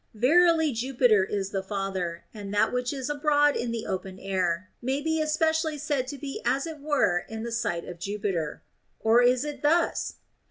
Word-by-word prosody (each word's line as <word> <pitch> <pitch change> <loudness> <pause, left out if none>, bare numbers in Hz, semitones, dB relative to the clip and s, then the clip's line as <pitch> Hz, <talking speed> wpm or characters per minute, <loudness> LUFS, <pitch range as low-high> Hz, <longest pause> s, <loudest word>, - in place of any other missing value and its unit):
Verily 320 +6 +4
Jupiter 240 -3 +3
is 195 0 -3
the 195 - -1
father, 190 -3 -3
and 205 -3 -7
that 205 - +3
which 250 0 -1
is 270 -3 -4
abroad 290 0 +3
in 240 - -2
the 230 -1 -3
open 190 0 -4
air 185 -1 -1
may 265 +3 0
be 320 +1 0
especially 315 0 +1
said 285 -3 -1
to 285 - -5
be 275 0 -6
as 260 +4 +1
it 320 -2 -7
were 285 -12 +2
in 220 0 -5
the 235 - -4
sight 175 -7 -1
of 175 -1 -8
Jupiter. 195 -5 -3 0.4
Or 225 +2 +4
is 250 +2 +3
it 290 -2 -6
tl 330 +3 +4
ills'? - - -5
245 Hz, 190 wpm, -27 LUFS, 195-290 Hz, 0.4 s, Verily